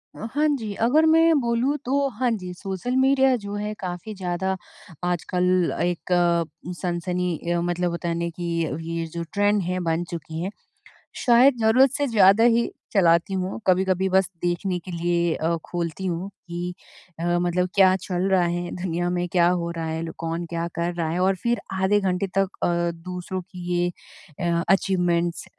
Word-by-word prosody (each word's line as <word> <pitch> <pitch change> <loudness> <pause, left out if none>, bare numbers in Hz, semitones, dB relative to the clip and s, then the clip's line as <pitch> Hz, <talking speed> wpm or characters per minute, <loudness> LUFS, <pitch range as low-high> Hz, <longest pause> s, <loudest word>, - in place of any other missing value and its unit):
अ, - - -7
हाँ 300 +2 +2
जी, 215 -4 -5
अगर 265 +10 +3
मैं 325 +1 +5
बोलूँ 240 +4 +1
तो 275 +2 +1
हाँ 255 -1 +2
जी, 185 -5 -4
सोशल 195 +6 -4
मीडिया 265 -1 +4
जो 200 0 -5
है 210 +1 -3
काफ़ी 180 +3 -5
ज़्यादा 190 0 -2 0.5
आजकल 180 0 +1
एक 175 +1 -2 0.7
सनसनी 180 -1 -1 0.2
अ, 175 - +1
मतलब 175 0 -1
बताने 170 0 -2
की 175 +1 -6 0.5
ये 165 0 -2
जो 170 0 -3
ट्रेंड 205 0 +2
है 180 +1 -2
बन 165 +2 0
चुकी 160 -1 -5
है। 190 - -2 0.8
शायद 250 +2 +6
ज़रूरत 250 +5 +5
से 285 -1 0
ज़्यादा 210 -1 +5
ही 235 0 +3 0.2
चलाती 170 -1 +3
हूँ, 185 +3 -3
कभी-कभी 190 0 +2
बस 190 0 +3
देखने 175 +1 -1
के 185 - -10
लिए 170 -1 0
अ, 165 +1 0
खोलती 175 +1 -4
हूँ 175 +2 -2 0.2
कि 175 +1 -4 0.5
अ, 170 - -2
मतलब 180 +1 0
क्या 190 -1 +6
चल 180 -2 -2
रहा 185 -2 +4
है 175 0 -2
दुनिया 175 -1 -2
में 180 0 -1
क्या 175 -1 +4
हो 175 -1 0
रहा 165 -1 -4
है? 160 0 -3
लो 165 -1 -5
कौन 165 +1 -3
क्या 170 0 -2
कर 170 +1 -1
रहा 170 -2 -1
है? 170 +3 -1
और 190 +1 +3
फिर 235 -3 +1
आधे 190 +2 +2
घंटे 190 0 0
तक 195 -1 +3
अ, - - +3 0.4
दूसरों 180 +1 -4
की 180 -1 -10
ये 175 0 +1 0.8
अचीवमेंट्स 175 -3 +1
180 Hz, 170 wpm, -24 LUFS, 175-205 Hz, 0.8 s, शायद